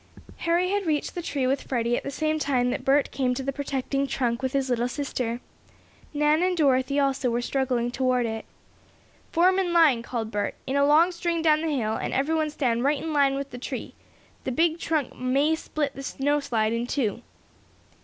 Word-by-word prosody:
Harry 350 +2 +2
had 405 -3 -1
reached 300 -2 0
the 350 - -4
tree 285 -5 -2
with 265 +2 +1
Freddie 240 -2 0
at - - -2
the - - -5
same 310 +2 -1
time 250 -4 +1
that - - -3
Bert 275 +1 +2
came 255 -2 0
to 265 - -3
the 275 +1 -2
protecting 275 0 -2
trunk 240 -3 -1
with 260 -1 -1
his 275 -1 +1
little 245 -1 0
sister. 250 -3 -3 0.7
Nan 300 +2 +2
and 365 0 +1
Dorothy 275 -2 +2
also 275 -2 +1
were 235 0 0
struggling 245 -1 -1
toward 255 -1 +1
it. 225 -1 -4 0.9
"Form 370 +3 +4
in 355 -2 0
line!" 310 -9 +5
called 230 -2 -4
Bert. 205 0 -2
"In 265 - -2
a 280 0 +4
long 320 +5 +5
string 340 -1 -2
down 310 -1 +4
the 325 - -1
hill, 235 -7 0
and - - -3
every 280 +4 +1
one 315 -1 +1
stand 245 -5 0
right 285 +2 +2
in 320 +2 -4
line 280 -2 +3
with 275 0 -4
the 245 - -7
tree. - - -5 0.5
The 260 - -2
big 325 +5 +1
trunk 310 -6 -1
may 275 +5 +2
split 300 -3 -2
the 275 - -8
snow 285 +2 0
slide 225 -5 0
in 235 +1 -2
two." 235 -4 -1
275 Hz, 205 wpm, -26 LUFS, 250-310 Hz, 0.9 s, line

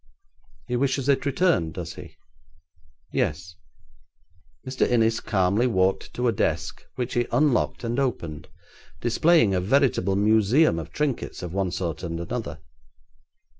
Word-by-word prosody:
'He 125 - -3
wishes 135 +1 0
it 140 +1 +2
returned, 140 - +1
does - - -5
he?' - - -11 1.0
'Yes.' 85 +4 -2 1.1
Mr. 130 0 0
Innis 115 -2 +2
calmly 100 +3 +1
walked 95 -4 0
to 125 0 0
a - - +4
desk, 110 - -2
which 125 0 -3
he 120 -1 0
unlocked 130 0 +1
and 120 +3 -1
opened, 85 - -3 0.5
displaying 120 - +3
a 90 - +1
veritable 105 -3 +2
museum 110 - +3
of 80 - -8
trinkets 145 -9 -3
of 90 -1 -6
one 95 -1 0
sort 85 -3 -4
and 85 -1 -4
another. 85 -5 -5
115 Hz, 130 wpm, -25 LUFS, 90-130 Hz, 1.1 s, a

